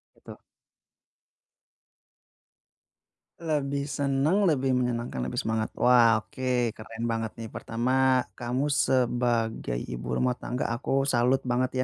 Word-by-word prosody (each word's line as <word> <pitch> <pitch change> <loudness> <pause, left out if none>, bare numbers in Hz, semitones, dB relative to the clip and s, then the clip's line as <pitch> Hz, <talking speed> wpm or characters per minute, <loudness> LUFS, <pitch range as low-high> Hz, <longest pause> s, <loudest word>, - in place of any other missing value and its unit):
Gitu. - - -13 3.0
Lebih 140 -4 -1
seneng, 145 +7 +1
lebih 135 -4 +1
menyenangkan, 120 - -1
lebih 65 0 -3
semangat. 110 0 -1
Wah, 120 -3 +5
oke, 125 -3 -1
keren 110 +1 -7
banget 115 -1 -2
nih. 115 -1 -6
Pertama, 130 +2 +1
kamu 125 +3 -1
sebagai 120 - +1
ibu - - -5
rumah 125 0 +1
tangga, 125 +1 -3
aku 135 +3 0
salut 125 +1 +3
banget, 125 +1 +1
125 Hz, 105 wpm, -27 LUFS, 115-135 Hz, 3.0 s, Wah